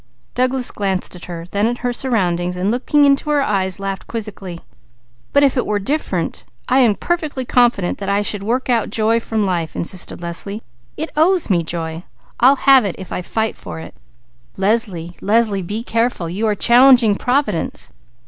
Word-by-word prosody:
Douglas 255 0 +1
glanced 190 -3 -2
at 180 - -10
her, 170 -2 -7
then 205 +2 +1
at 240 +1 -2
her 245 - 0
surroundings, 180 -8 0
and 190 +3 0
looking 285 +4 +2
into 280 +2 +2
her 290 -2 +2
eyes 190 -5 0
laughed 195 -1 -5
quizzically. 205 -6 -6 0.7
"But 285 - +4
if 275 -1 +3
it 250 - +2
were 210 - +1
different, 280 +10 -2 0.2
I 260 +1 +3
am 230 -5 +4
perfectly 310 -5 -2
confident 240 -7 +2
that 200 -1 -4
I 200 +1 +1
should 205 -1 -3
work 240 +6 -1
out 235 -3 +1
joy 220 +2 +1
from 220 -2 -1
life," 170 -4 -2
insisted 180 +1 -1
Leslie. 180 +5 -6 0.3
"It 315 - -4
owes 335 - +3
me 175 -2 +3
joy! 165 0 -4 0.4
I'll 260 +4 +6
have 270 -2 +5
it, 200 -4 -3
if 190 - -9
I - - -3
fight 220 +4 -2
for - - -8
it!" - - -10 0.6
"Leslie! 190 -4 0
Leslie! 210 -1 +2
Be 210 +6 -4
careful! 230 -7 -1
You 200 +7 -2
are 210 - +1
challenging 245 0 +6
Providence. 250 - -1
215 Hz, 175 wpm, -18 LUFS, 185-250 Hz, 0.7 s, I'll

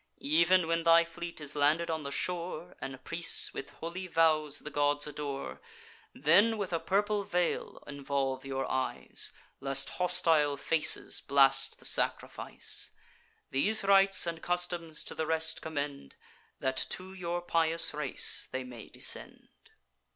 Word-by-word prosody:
Ev'n 170 +4 +4
when 165 +1 0
thy 165 0 +6
fleet 170 0 -7
is 150 -1 -7
landed 155 +4 +2
on 160 -1 -2
the 140 - -5
shore, 175 +2 -3
And 135 -1 -7
priests 170 +1 0
with 140 - -6
holy 175 +3 -7
vows 155 -3 +2
the 150 - -8
gods 145 0 +1
adore, 145 -2 -5 0.5
Then 200 - +4
with 195 -4 -3
a 165 - +1
purple 205 +4 0
veil 180 -2 -2
involve 140 -2 -2
your 135 -1 -3
eyes, 130 0 -2 0.3
Lest 135 0 +1
hostile 160 -5 +3
faces 155 +2 +1
blast 135 -1 +4
the - - -10
sacrifice. - - -1 0.6
These 200 +12 +3
rites 195 -1 +4
and 165 -1 -4
customs 175 -3 -3
to - - -6
the 160 - -3
rest 160 0 0
commend, 145 - -5 0.4
That 130 0 -1
to 185 +1 -7
your 175 -2 -3
pious 165 -2 +1
race 150 -3 +1
they 130 0 -3
may 120 -3 -10
descend. - - -3
160 Hz, 140 wpm, -31 LUFS, 140-175 Hz, 0.6 s, thy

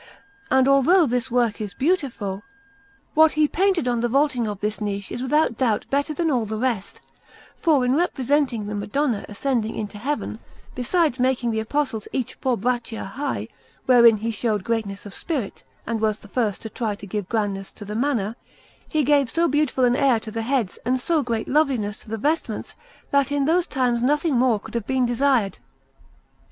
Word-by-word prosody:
And 265 0 +4
although 275 +7 +5
all - - +5
this 250 0 -1
work 235 -3 +1
is 205 -2 -5
beautiful, 255 - -1 0.7
what 315 0 +5
he 305 0 +3
painted 375 -4 +1
on 240 -1 +1
the 240 +1 0
vaulting 270 -3 +2
of 205 -2 -4
this 210 +1 -2
niche 200 -1 -3
is 245 - -4
without 260 -2 +1
doubt 230 -5 +1
better 285 +2 +1
than 325 +1 0
all 240 -5 0
the 215 +1 -3
rest, 230 -5 -2 0.5
for 295 -7 +2
in 250 +2 +2
representing 275 -7 +1
the 210 - -4
Madonna 210 +3 -1
ascending 225 0 -1
into 210 -1 -5
Heaven, 270 -3 -3 0.3
besides 265 +2 +1
making 250 -2 +1
the 220 - -1
Apostles 225 -1 -2
each 255 -3 -2
four 255 -3 -1
braccia 240 +1 -2
high, 275 +8 -3 0.4
wherein 235 -3 +7
he 225 +2 -2
showed 215 -2 -1
greatness 215 -3 -3
of 200 - -9
spirit 275 - -4 0.2
and 225 -1 -2
was 215 -1 +1
the 205 - -15
first 215 -2 -1
to 220 - -5
try 220 -4 -2
to 200 - -11
give 200 -1 -4
grandness 200 -3 -2
to 205 - -10
the 210 - -6
manner, 230 -3 0 0.5
he 310 -1 +1
gave 280 -2 +3
so 335 +7 +2
beautiful 290 -3 +2
an 245 0 +3
air 270 -4 +3
to 220 - -7
the 225 +1 -3
heads 235 -4 -1
and 255 +2 +1
so 320 +4 +1
great 230 -4 -2
loveliness 260 -8 +1
to - - -14
the 225 - -3
vestments 300 +9 -2 0.4
that 280 0 +2
in 285 -1 +1
those 340 +3 +2
times 250 -3 0
nothing 295 +4 +2
more 240 -3 +3
could - - -12
have 235 -3 -3
been 260 -1 +2
desired. 245 -4 +1
245 Hz, 190 wpm, -23 LUFS, 220-280 Hz, 0.7 s, wherein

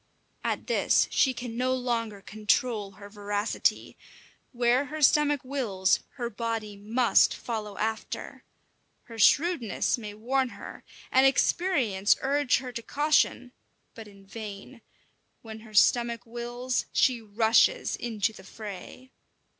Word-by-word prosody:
At - - -2
this 480 - +2
she 265 - +3
can 240 -2 -7
no 255 +2 0
longer 230 -5 -3
control 215 -1 -1
her 200 +1 -12
voracity. 205 +1 -2 0.6
Where 245 +2 +2
her 305 +2 -6
stomach 290 0 +4
wills, 225 -8 0 0.2
her 245 -3 -3
body 225 -2 -4
must 225 +4 +2
follow 215 -3 -5
after. 220 +1 -4 0.6
Her 230 -1 -11
shrewdness 280 - +2
may 210 -2 -8
warn 255 +4 0
her, - - -10 0.3
and 265 +1 +5
experience 265 - +2
urge 280 0 +2
her 255 -1 -6
to 235 -1 -6
caution, 290 -2 +1 0.4
but 225 -2 -10
in 200 -1 -17
vain: 215 +3 -9 0.6
when 220 -1 -9
her 215 -1 -14
stomach 235 +2 +3
wills, 240 +2 -3
she 250 -3 +2
rushes 225 - +2
into 225 -2 -2
the 190 - -13
fray. 215 +5 -10
235 Hz, 125 wpm, -27 LUFS, 210-255 Hz, 0.6 s, and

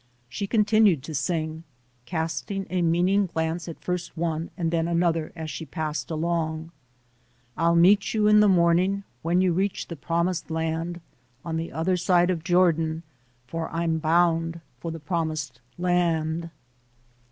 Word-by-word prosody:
She 200 +11 -4
continued 210 - +3
to 160 - -7
sing, 160 +2 -2 0.4
casting 165 +4 -3
a 185 -1 +1
meaning 180 +4 +2
glance 160 0 -2
at 165 - -7
first 180 -1 -4
one 165 0 -2
and 165 -3 -1
then 165 -1 +1
another 170 -2 +1
as 160 -2 -5
she - - -5
passed 155 0 -4
along: 160 0 -2 0.8
I'll 170 +1 +2
meet 195 +4 +5
you 210 -1 +3
in 210 0 +6
the 210 -1 +6
morning, 180 +2 +3 0.2
When 175 +3 +2
you 185 -2 +2
reach 190 +3 -1
the 170 - -5
promised 170 +3 -1
land, 165 +2 -2 0.4
On 165 -1 -3
the 165 +1 -3
other 180 +3 0
side 175 0 +3
of 165 -3 -3
Jordan, 165 -3 +2 0.4
For 160 +5 -4
I'm 165 -1 -1
bound 165 +1 +2 0.2
for 165 - -5
the 165 0 -5
promised 155 -5 -3 0.2
land. 170 -2 0
170 Hz, 150 wpm, -25 LUFS, 160-180 Hz, 0.8 s, in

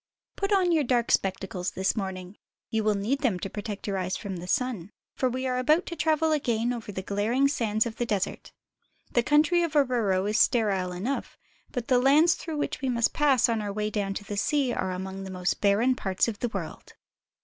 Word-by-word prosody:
PUT 395 +1 -2
on 375 -3 +3
your 320 -3 +3
dark 240 -2 +1
spectacles 190 -1 0
this 190 0 0
morning. 190 -2 -5 0.4
You 220 -1 0
will 215 -1 +2
need 220 +8 -1
them 245 -10 +1
to 195 - -4
protect 210 -1 -6
your 195 -2 -1
eyes 185 0 -2
from 195 -4 -5
the 175 +1 -8
sun, 215 -3 -1 0.2
for 260 - 0
we 255 +1 -3
are 255 -1 0
about 305 +7 +3
to 340 - -6
travel 315 0 +1
again 240 -5 0
over 230 -3 -6
the 190 -1 -5
glaring 220 +8 +1
sands 225 -6 0
of 230 -1 -5
the 240 - -1
desert. 205 -4 -2 0.6
The 240 - +3
country 300 +6 +3
about 295 -5 +2
Oruro 200 -6 +1
is 215 +1 +1
sterile 195 -6 +2
enough, 205 +10 -4 0.3
but 245 -3 -4
the 250 -1 +4
lands 300 +6 +5
through 320 -3 -6
which 290 - -3
we 265 - -1
must 235 -2 +1
pass 280 -6 +3
on 230 -2 0
our 205 -1 -3
way 210 +1 -2
down 200 -2 -2
to 205 - -5
the 205 0 -6
sea 275 +2 +1
are 190 - -2
among 190 +1 -5
the 195 - -7
most 180 -1 -2
barren 215 +6 +3
parts 190 -3 0
of 220 -3 -4
the 240 - -1
world. 195 -7 -7
225 Hz, 215 wpm, -27 LUFS, 195-265 Hz, 0.6 s, lands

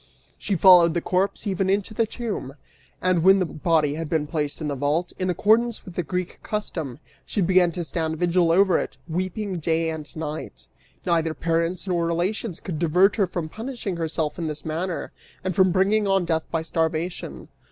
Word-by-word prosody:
She 200 - -1
followed 175 -2 +7
the - - +2
corpse, 190 +5 0
even 195 -1 0
into 200 +2 0
the 225 +1 +1
tomb; 210 - -5 0.5
and 185 -2 +3
when 190 +3 +6
the 185 - +1
body 155 -2 +1
had 160 0 -4
been 160 -3 +1
placed 150 -1 -3
in 155 - -3
the 145 - -1
vault, 145 +6 -1
in 185 0 0
accordance 220 +6 +2
with 180 - -9
the 180 - -1
Greek 180 +2 -4
custom, 160 - -4 0.3
she - - -3
began 180 -1 +4
to 175 - -3
stand 160 +1 -2
vigil 175 0 +2
over 190 0 +4
it, - - -5
weeping 185 +3 -3
day 165 +1 0
and 155 -3 -8
night! 155 -1 -6 0.4
Neither 165 -3 +1
parents 170 +2 -1
nor 170 -2 +1
relations 175 +3 -2
could 165 -5 -5
divert 180 +6 +3
her 200 -3 +3
from 175 -2 -4
punishing 220 -1 -5
herself 160 -1 -2
in 165 - -2
this 150 -1 -5
manner 165 +3 -3 0.3
and 185 -2 -2
from 190 -1 +4
bringing 200 +3 +2
on 195 -2 +2
death 160 -1 0
by 165 -1 -1
starvation. 160 +1 -2
175 Hz, 185 wpm, -24 LUFS, 160-190 Hz, 0.5 s, followed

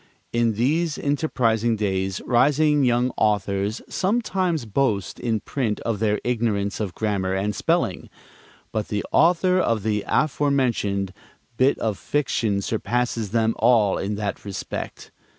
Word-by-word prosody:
In 120 -1 +2
these 150 +8 0
enterprising 120 -6 +1
days 95 -3 -1
rising 145 +4 +3
young 125 0 +2
authors 100 0 0
sometimes 185 - 0
boast 110 -3 -1
in 115 -3 -1
print 115 -7 -2
of 115 -3 -2
their 105 -1 +1
ignorance 110 -4 -1
of 100 -5 -3
grammar 100 -3 -1
and 100 +2 -1
spelling, - - 0 0.6
but 110 -1 -2
the 105 -1 -2
author 180 +3 +4
of 115 - +1
the 105 -1 0
aforementioned 125 -10 +1 0.4
bit 130 +4 +3
of 110 -3 -2
fiction 115 -8 0
surpasses 115 0 -1
them 110 +1 +1
all 110 -4 +4
in 100 +2 -2
that 105 -1 -4
respect. 100 -2 -6
115 Hz, 130 wpm, -23 LUFS, 105-135 Hz, 0.6 s, author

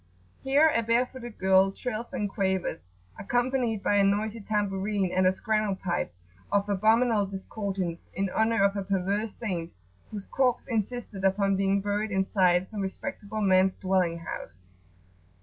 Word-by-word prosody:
Here 280 +4 +4
a 230 - +2
bare 230 +2 +2
footed 240 -3 -10
girl 190 +1 +4
trills 235 +2 -5
and 235 -7 -1
quavers, 190 - -2 0.3
accompanied 245 -1 0
by 205 - +2
a 200 - +5
noisy 210 +3 0
tambourine 200 -2 -1
and 185 0 +3
a - - +5
"scrannel 215 +1 0
pipe" 175 - -2 0.4
of 200 0 +2
abominable 215 +1 +3
discordance, 190 -3 -4
in 195 +2 0
honour 220 -2 +2
of 200 0 +3
a 200 - -1
perverse 195 +3 -1
saint 180 -7 -4 0.4
whose 205 -2 -7
corpse 255 -2 +1
insisted 225 -3 -3
upon 195 +1 +2
being 195 +1 +1
buried 205 +2 -1
inside 190 -2 +2
some 210 -2 -4
respectable 215 0 -5
man's 190 -1 +4
dwelling 185 -3 +1
house. 90 - -8
200 Hz, 150 wpm, -27 LUFS, 190-220 Hz, 0.4 s, a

